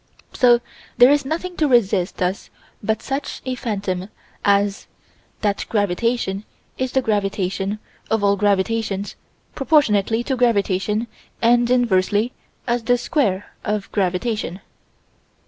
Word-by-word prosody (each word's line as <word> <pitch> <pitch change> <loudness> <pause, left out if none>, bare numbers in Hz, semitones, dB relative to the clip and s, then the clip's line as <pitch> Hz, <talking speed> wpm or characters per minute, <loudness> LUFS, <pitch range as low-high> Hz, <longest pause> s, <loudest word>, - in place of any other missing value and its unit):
So 240 -1 +5 0.4
there 245 +3 +8
is 290 -1 +2
nothing 340 +5 -3
to 305 - +2
resist 200 -8 +2
us 180 +2 -2 0.3
but 220 +1 -1
such 275 +1 -3
a 255 - -1
phantom 200 -6 -3 0.3
as 200 0 +2 0.5
that 205 -2 -1
gravitation 205 0 0 0.3
is 260 -1 -3
the 265 - +2
gravitation 195 -1 -1 0.3
of 220 -2 +1
all 200 0 +4
gravitations 205 0 0 0.4
proportionately 230 -7 +2
to 265 +1 -1
gravitation 210 -2 +1 0.3
and 240 +1 +3
inversely 220 -2 +2 0.3
as 240 -1 0
the 245 +2 +2
square 210 - -1
of 210 -1 -2
gravitation. 195 0 -1
215 Hz, 115 wpm, -21 LUFS, 195-245 Hz, 0.5 s, there